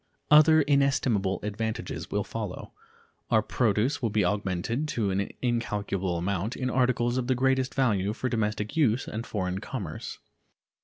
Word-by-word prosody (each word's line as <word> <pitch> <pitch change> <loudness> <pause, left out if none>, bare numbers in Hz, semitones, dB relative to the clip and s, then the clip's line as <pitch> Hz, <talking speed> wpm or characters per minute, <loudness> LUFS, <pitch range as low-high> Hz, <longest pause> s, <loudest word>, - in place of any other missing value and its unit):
Other 155 +1 +7
inestimable 135 -9 +2
advantages 110 +3 -4
will 105 0 0
follow. 105 -4 -6 0.6
Our 110 - +3
produce 120 +5 +1
will 115 - +1
be 105 -2 +1
augmented 105 +8 -1
to 110 -9 -1
an 100 +1 -1
incalculable 100 -6 -1
amount 95 +5 -2
in 130 -1 -2
articles 125 -1 +1
of 125 - -3
the 130 - +2
greatest 130 0 +1
value 105 -7 +2
for 130 - -3
domestic 105 -3 -2
use 135 -6 +2
and 115 +2 -5
foreign 95 -2 -2
commerce. 100 - -6
110 Hz, 145 wpm, -27 LUFS, 100-130 Hz, 0.6 s, Other